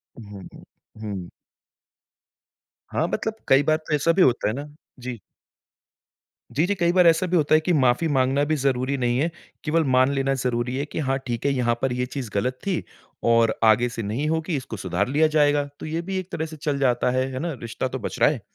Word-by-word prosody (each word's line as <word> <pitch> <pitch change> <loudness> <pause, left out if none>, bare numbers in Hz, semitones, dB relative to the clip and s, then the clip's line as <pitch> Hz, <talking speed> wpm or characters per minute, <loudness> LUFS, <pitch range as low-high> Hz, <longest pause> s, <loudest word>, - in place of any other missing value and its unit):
उहुँ, 105 -4 -10
हुँ। - - -14 0.4
हुँ। 100 -5 -5 1.6
हाँ, - - +1
मतलब 220 0 -2
कई 135 +2 +5
बार 155 +1 +2
तो 155 -1 -6
ऐसा 150 +3 +2
भी 190 - +2
होता 125 -6 +3
है 105 - 0
ना 145 +2 -6 0.3
जी। 125 -2 -6 1.4
जी, 160 - +3
जी। 200 +3 0
कई 175 -2 +2
बार 180 -1 +5
ऐसा 165 +2 +4
भी 180 - +2
होता 155 -1 +2
है - - +6
कि 175 +2 0
माफ़ी 130 +2 +3
माँगना 135 -1 +2
भी 155 - +3
ज़रूरी 135 -1 0
नहीं 120 -1 0
है, 160 +4 +1 0.3
केवल 160 +1 +2
मान 130 +2 +4
लेना 135 0 +1
ज़रूरी 125 -1 -1
है 140 - -1
कि 155 - -6
हाँ, 135 -2 0
ठीक 120 +2 -3
है 140 - +3
यहाँ 120 -2 +1
पर 135 -2 0
ये 125 0 -1
चीज़ 130 -2 -6
गलत 125 +6 -1
थी 185 -4 0 0.4
और 115 -1 +3
आगे 115 +2 +4
से 115 -1 -5
नहीं 115 +9 -2
होगी, 160 0 -1
इसको 120 -4 -6
सुधार 95 +2 -1
लिया 150 +4 +3
जाएगा। 145 -1 +3
तो - - -7
ये 160 +2 -2
भी 190 +2 -4
एक 185 +1 -8
तरह 160 - -2
से 155 0 -9
चल 145 -1 -2
जाता 125 -2 +2
है, 130 +1 0
है 130 - -3
ना? 170 +2 -3
रिश्ता 115 +2 -3
तो 130 +1 -5
बच - - -5
रहा - - +6
है। - - -3
135 Hz, 225 wpm, -24 LUFS, 120-155 Hz, 1.6 s, है